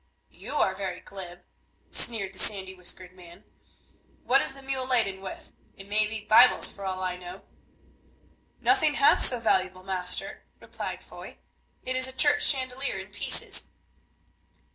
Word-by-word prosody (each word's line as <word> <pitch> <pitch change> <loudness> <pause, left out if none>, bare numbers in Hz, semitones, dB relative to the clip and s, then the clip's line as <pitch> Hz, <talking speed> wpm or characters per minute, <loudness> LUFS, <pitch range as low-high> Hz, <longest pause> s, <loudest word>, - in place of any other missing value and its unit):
"You - - -10
are 190 -9 0
very 190 -2 -7
glib," 180 -2 -11 0.5
sneered 200 -5 +6
the 190 - -3
sandy 190 -2 +3
whiskered 180 0 -4
man; 180 +1 -17 0.8
"what 270 +2 +1
is - - -2
the 275 0 -13
mule 265 -1 -5
laden 215 -7 -2
with? 190 - -11 0.3
It 195 - -11
may 210 +1 -1
be 220 0 -8
Bibles 250 +3 +4
for 200 - -11
all 185 0 -6
I 180 -1 -4
know." 180 +1 -12 1.2
"Nothing 315 -7 0
half 280 - +2
so 245 - +7
valuable, 185 -4 -2
master," 185 -1 -3 0.2
replied - - -9
Foy; - - -14 0.5
"it 255 0 -4
is 260 0 +3
a 260 - -9
church 290 +2 +2
chandelier 260 -3 -1
in 190 +1 -11
pieces." 205 - +1
195 Hz, 150 wpm, -24 LUFS, 185-255 Hz, 1.2 s, so